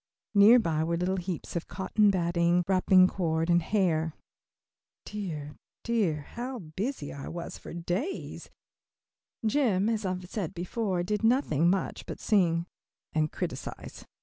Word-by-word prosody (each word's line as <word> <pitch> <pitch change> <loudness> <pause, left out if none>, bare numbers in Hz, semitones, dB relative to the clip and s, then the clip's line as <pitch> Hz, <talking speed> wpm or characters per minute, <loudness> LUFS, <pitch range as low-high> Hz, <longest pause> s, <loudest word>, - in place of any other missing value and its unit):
Near 210 +4 +8
by 165 -9 +1
were 170 +1 0
little 185 +2 0
heaps 180 -1 -5
of 170 - -3
cotton 205 +3 +2
batting, 175 -1 +2
wrapping 185 -1 +5
cord, 165 -2 0
and 175 0 +4
hair. 165 -4 +1 0.9
Dear, 155 -8 -5 0.3
dear, 205 -10 +1
how 250 +2 -4
busy 185 - -4
I 140 - -7
was 170 0 -6
for - - -10
days! 175 - -4 1.0
Jim, 220 -5 +2
as 220 -2 -1
I 190 - -1
have 180 0 -9
said 190 -1 -4
before, 180 +1 -1
did 210 +4 -2
nothing 225 - +3
much 190 +1 -1
but - - -6
sing 170 -5 +2 0.5
and 155 -1 +1
criticise. - - -6
180 Hz, 140 wpm, -29 LUFS, 170-210 Hz, 1.0 s, Near